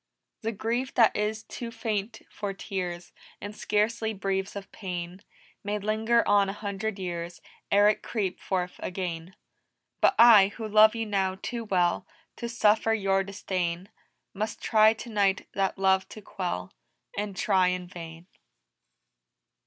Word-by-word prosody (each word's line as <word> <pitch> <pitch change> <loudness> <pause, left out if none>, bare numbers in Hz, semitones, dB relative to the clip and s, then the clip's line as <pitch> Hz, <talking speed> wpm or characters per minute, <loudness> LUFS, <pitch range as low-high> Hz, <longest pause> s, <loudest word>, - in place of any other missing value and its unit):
"The 225 - -1
grief 235 +5 -2
that 230 -3 +5
is 215 +1 -1
too 235 - -7
faint 220 -1 -3
for 205 -1 -5
tears, 180 -3 -5 0.3
And 205 +1 -7
scarcely 220 +1 0
breathes 195 0 -2
of 200 -1 -8
pain, 180 -1 -6 0.4
May 205 +1 -1
linger 220 +3 +1
on 200 -1 +4
a - - -3
hundred 205 0 -4
years 175 -2 -5 0.3
Ere 205 +1 +6
it 210 - +2
creep 200 -5 -3
forth 180 -2 -3
again. 180 -1 -5 0.7
But - - +5
I, 225 -4 +8
who 225 -2 -4
love 215 +1 +6
you 225 -1 -2
now 190 -2 0
too 235 +1 -4
well 180 -4 +1 0.3
To 235 - -4
suffer 225 -1 +3
your 195 -2 +1
disdain, 185 -2 -3 0.4
Must 210 +1 -3
try 220 0 +5
tonight 205 -4 0
that 195 0 0
love 190 0 +2
to 215 - -10
quell 175 - -4 0.4
And 205 -1 -4
try 190 -4 +3
in 180 0 -1
vain!" 165 -1 -10
200 Hz, 145 wpm, -27 LUFS, 185-220 Hz, 0.7 s, I